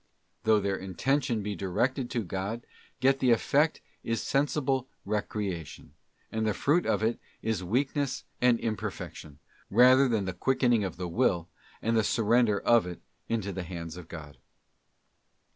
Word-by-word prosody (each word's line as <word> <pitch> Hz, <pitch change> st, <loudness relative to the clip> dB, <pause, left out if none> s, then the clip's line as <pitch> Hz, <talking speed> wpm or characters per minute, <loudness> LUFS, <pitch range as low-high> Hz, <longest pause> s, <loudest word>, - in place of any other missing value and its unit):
Though 110 Hz, -1 st, +5 dB
their 100 Hz, -1 st, -1 dB
intention 120 Hz, +5 st, 0 dB
be 105 Hz, 0 st, -3 dB
directed 120 Hz, +8 st, -1 dB
to 120 Hz, -, -1 dB
God, 100 Hz, +6 st, -4 dB, 0.4 s
yet 135 Hz, +1 st, +4 dB
the 130 Hz, -, +2 dB
effect 145 Hz, +6 st, +3 dB, 0.2 s
is 115 Hz, -1 st, -1 dB
sensible 135 Hz, -2 st, 0 dB, 0.2 s
recreation, 100 Hz, -8 st, -4 dB, 0.4 s
and 110 Hz, 0 st, -1 dB
the 105 Hz, -, 0 dB
fruit 155 Hz, -, +2 dB
of -, -, +1 dB
it 115 Hz, +1 st, +1 dB, 0.2 s
is 110 Hz, -4 st, -1 dB
weakness 135 Hz, +6 st, -1 dB, 0.2 s
and 125 Hz, -2 st, +4 dB
imperfection, 90 Hz, -8 st, -5 dB, 0.3 s
rather 130 Hz, +5 st, +6 dB
than 110 Hz, -5 st, 0 dB
the 95 Hz, -, -3 dB
quickening 120 Hz, +2 st, +2 dB
of 95 Hz, -, -4 dB
the 90 Hz, -1 st, -3 dB
will, 90 Hz, -3 st, +1 dB, 0.3 s
and 115 Hz, +1 st, +1 dB
the 110 Hz, -, +3 dB
surrender 115 Hz, -1 st, +3 dB
of 115 Hz, -6 st, +4 dB
it 90 Hz, -, -7 dB, 0.3 s
into 105 Hz, -4 st, -1 dB
the 95 Hz, -, -4 dB
hands 85 Hz, -2 st, -6 dB
of 90 Hz, -2 st, -10 dB
God. 75 Hz, -4 st, -10 dB
110 Hz, 150 wpm, -29 LUFS, 95-125 Hz, 0.4 s, rather